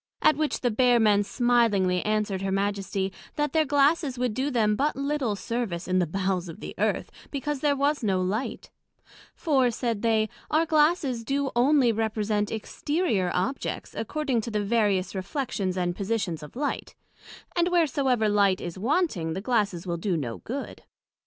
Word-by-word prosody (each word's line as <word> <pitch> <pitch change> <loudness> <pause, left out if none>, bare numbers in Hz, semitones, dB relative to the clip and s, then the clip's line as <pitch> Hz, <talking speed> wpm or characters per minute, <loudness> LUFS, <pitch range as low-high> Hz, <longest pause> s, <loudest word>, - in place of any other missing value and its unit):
At 310 - +6
which 305 0 -1
the 245 - +1
Bear 245 +2 +4
men 210 -2 +4
smilingly 205 -5 +2
answered 210 -3 0
her 195 0 -1
Majesty, 195 -1 -1 0.2
that 295 -2 -1
their 315 -1 +3
Glasses 285 -1 +2
would 245 -2 0
do 265 +6 -1
them 220 -5 +2
but 285 +7 0
little 275 -5 -1
service 200 -5 -3
in 185 0 +2
the 175 - +1
bowels 185 0 -1
of 165 - -9
the - - -7
Earth, - - 0 0.2
because 290 0 -3
there 285 0 +2
was 285 +2 +1
no 195 -3 +1
light; 200 +7 -3 0.6
for, 270 -6 +2
said 230 -2 -2
they, 220 -2 +2 0.2
our 315 +2 +3
Glasses 300 -6 +2
do 275 +2 -1
onely 255 0 +4
represent 215 -1 -1
exterior 225 - -1
objects, 215 +10 -2
according 265 0 -1
to 230 - -5
the 210 -2 -1
various 205 -3 +1
reflections 195 -2 -3
and 175 -1 -1
positions 200 -5 -2
of 150 - -11
light; 285 +3 -3 0.6
and 345 0 +2
wheresoever 275 -9 +2
light 200 -2 +3
is 175 +1 -6
wanting, 225 - 0
the 185 - -3
glasses 205 -6 0
wil 170 -1 -2
do 175 0 -1
no 120 -7 -4
good. 275 +4 -6
225 Hz, 165 wpm, -26 LUFS, 195-275 Hz, 0.6 s, At